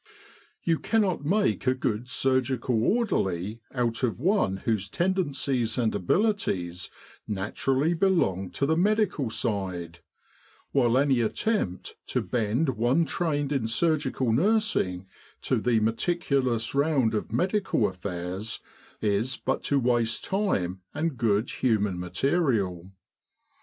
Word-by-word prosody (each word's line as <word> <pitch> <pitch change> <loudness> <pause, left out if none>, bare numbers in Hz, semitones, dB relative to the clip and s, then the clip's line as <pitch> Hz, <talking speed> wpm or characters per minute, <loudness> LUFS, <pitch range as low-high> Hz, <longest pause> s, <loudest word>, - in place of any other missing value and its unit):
You 165 -2 +1
cannot 200 -9 +1
make 195 -2 +1
a 130 - +4
good 120 -1 -2
surgical 130 -3 +1
orderly 110 - 0
out 120 -3 -1
of 120 -3 0
one 165 - +2
whose 105 -5 0
tendencies 140 - 0
and 115 -3 +1
abilities 95 - 0 0.4
naturally 130 - 0
belong 160 - +1
to 140 - 0
the 160 +3 +2
medical 200 - +1
side; 95 -7 -3 0.7
while 125 -3 +3
any 135 -3 +3
attempt 115 - -1
to - - 0
bend 120 +5 0
one 130 +7 +2
trained 145 -4 -1
in 135 -6 0
surgical 135 -2 +1
nursing 175 - +1 0.4
to - - +1
the 120 -2 +2
meticulous 125 0 0
round 140 -5 +2
of 105 - -2
medical 180 - +1
affairs, 90 +2 -4 0.4
is 110 +5 0
but 135 - -1
to 145 - +2
waste 120 -3 +1
time 95 - -1
and 160 -2 -1
good 110 -1 +1
human 105 -7 0
material. 95 - 0
125 Hz, 115 wpm, -27 LUFS, 105-160 Hz, 0.7 s, a